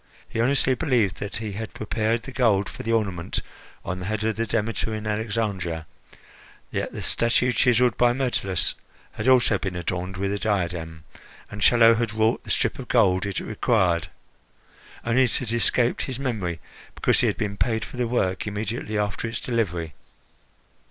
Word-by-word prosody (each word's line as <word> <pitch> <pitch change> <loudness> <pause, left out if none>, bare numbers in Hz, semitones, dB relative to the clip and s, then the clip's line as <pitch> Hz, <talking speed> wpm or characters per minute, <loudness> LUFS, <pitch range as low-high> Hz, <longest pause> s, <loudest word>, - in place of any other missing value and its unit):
He 115 - -2
honestly 130 +1 +3
believed 125 - +1
that 100 0 -5
he 110 -2 -3
had 110 +2 -6
prepared 110 +1 -1
the 135 - -8
gold 110 -7 +2
for - - -8
the 115 - -2
ornament 95 -7 0 0.5
on 90 +1 -3
the 90 - -5
head 110 0 -2
of 110 -1 0
the 115 0 -1
Demeter 110 0 -1
in 110 0 -5
Alexandria; 105 -6 -2 0.9
yet - - -2
the - - -6
statue 115 +2 +2
chiselled 125 -1 +3
by 120 0 +5
Myrtilus 120 -8 0 0.4
had 110 - -4
also 125 -5 +5
been 95 -3 -3
adorned 90 +2 -3
with 100 +1 -1
a 100 - -2
diadem, 85 -6 -2 0.5
and 105 0 -7
Chello 115 +1 +6
had 115 -2 -1
wrought 110 +1 +1
the - - -12
strip - - 0
of - - -7
gold 95 +1 +3
it 100 - -2
required. 95 -7 +1 1.0
Only 120 +3 +4
it 120 - 0
had 120 -4 -3
escaped 120 +1 +2
his 130 - -3
memory, 105 - -2 0.4
because - - +2
he - - +3
had - - 0
been 100 -1 -2
paid 110 +2 0
for - - -10
the 125 -1 0
work 100 -5 0
immediately 105 +1 -3
after 105 +2 -1
its 115 -1 -3
delivery. 90 -10 -2
110 Hz, 175 wpm, -25 LUFS, 95-115 Hz, 1.0 s, Chello